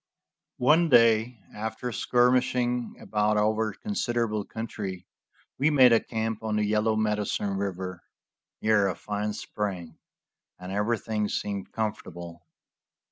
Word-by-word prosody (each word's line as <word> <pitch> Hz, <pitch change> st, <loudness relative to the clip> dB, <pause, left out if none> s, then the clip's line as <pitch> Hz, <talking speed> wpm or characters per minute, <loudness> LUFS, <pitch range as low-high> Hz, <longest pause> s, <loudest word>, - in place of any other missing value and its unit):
One 160 Hz, +6 st, +4 dB
day, 115 Hz, -1 st, +4 dB, 0.2 s
after 110 Hz, +3 st, -4 dB
skirmishing 125 Hz, 0 st, +1 dB
about 105 Hz, 0 st, 0 dB
over 110 Hz, +1 st, +1 dB
considerable 120 Hz, -, -2 dB
country, 100 Hz, -5 st, -6 dB, 0.5 s
we 145 Hz, +3 st, +4 dB
made 130 Hz, -5 st, +6 dB
a 115 Hz, -, +6 dB
camp 110 Hz, -1 st, -3 dB
on 110 Hz, -1 st, -2 dB
the 105 Hz, 0 st, +1 dB
Yellow 110 Hz, +1 st, +1 dB
Medicine 105 Hz, -2 st, -1 dB
river, 95 Hz, -2 st, -4 dB, 0.6 s
near 110 Hz, -2 st, +4 dB
a 95 Hz, -, -2 dB
fine 105 Hz, 0 st, -3 dB
spring, 90 Hz, -8 st, -5 dB, 0.6 s
and 90 Hz, +1 st, -8 dB
everything 105 Hz, 0 st, -1 dB
seemed 100 Hz, -2 st, -3 dB
comfortable. 85 Hz, -6 st, -5 dB
110 Hz, 115 wpm, -27 LUFS, 105-115 Hz, 0.6 s, made